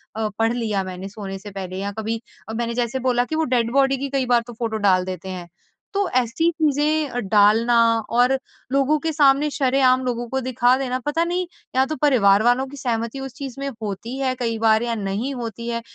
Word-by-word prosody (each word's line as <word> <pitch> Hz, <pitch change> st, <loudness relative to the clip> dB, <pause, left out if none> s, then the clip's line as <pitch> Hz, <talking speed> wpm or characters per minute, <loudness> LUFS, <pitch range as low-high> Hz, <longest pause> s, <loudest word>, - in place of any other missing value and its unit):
अ, 220 Hz, 0 st, -1 dB
पढ़ 225 Hz, +1 st, +2 dB
लिया 215 Hz, -5 st, -1 dB
मैंने 185 Hz, 0 st, -6 dB
सोने 195 Hz, -1 st, -7 dB
से 205 Hz, +1 st, -10 dB
पहले? 185 Hz, -1 st, -6 dB
या 200 Hz, +1 st, -3 dB
कभी 225 Hz, +1 st, -3 dB, 0.3 s
अ, -, -, -4 dB
मैंने 235 Hz, +1 st, -2 dB
जैसे 245 Hz, +1 st, -1 dB
बोला 245 Hz, -1 st, +1 dB
कि 315 Hz, -, -4 dB
वो 320 Hz, -, +1 dB
डेड 235 Hz, -1 st, +1 dB
बॉडी 270 Hz, 0 st, +3 dB
की 275 Hz, +1 st, -4 dB
कई 270 Hz, -1 st, 0 dB
बार 240 Hz, -1 st, +3 dB
तो 240 Hz, -, -8 dB
फ़ोटो 225 Hz, -1 st, -3 dB
डाल 185 Hz, -3 st, +3 dB
देते 185 Hz, 0 st, -6 dB
हैं। 180 Hz, -2 st, -6 dB, 0.5 s
तो 400 Hz, -1 st, +1 dB
ऐसी 255 Hz, +6 st, +1 dB
अ, -, -, 0 dB
चीज़ें 295 Hz, -5 st, +1 dB
डालना 220 Hz, +3 st, +4 dB, 0.3 s
और 245 Hz, +3 st, +3 dB, 0.3 s
लोगों 275 Hz, +3 st, +3 dB
के 320 Hz, +2 st, -2 dB
सामने 285 Hz, 0 st, +4 dB
शरेआम 260 Hz, -2 st, +3 dB
लोगों 240 Hz, -1 st, -2 dB
को 265 Hz, -, -1 dB
दिखा 250 Hz, 0 st, +2 dB
देना, 255 Hz, -1 st, -2 dB
पता 325 Hz, +3 st, +1 dB
नहीं 355 Hz, +1 st, -1 dB, 0.3 s
या 265 Hz, +1 st, +4 dB
तो 310 Hz, -, -4 dB
परिवार 215 Hz, -8 st, +4 dB
वालों 245 Hz, +2 st, +3 dB
की 285 Hz, -, -10 dB
सहमति 235 Hz, -1 st, -2 dB
उस 270 Hz, -2 st, -6 dB
चीज़ 275 Hz, -4 st, -7 dB
में 275 Hz, -, -3 dB
होती 215 Hz, +5 st, -5 dB
है 265 Hz, -1 st, 0 dB
कई 230 Hz, -2 st, -1 dB
बार 220 Hz, 0 st, +3 dB
या 235 Hz, -1 st, -1 dB
नहीं 210 Hz, +6 st, -3 dB
होती 235 Hz, -1 st, -6 dB
है। 235 Hz, 0 st, -2 dB
240 Hz, 220 wpm, -22 LUFS, 220-270 Hz, 0.5 s, डालना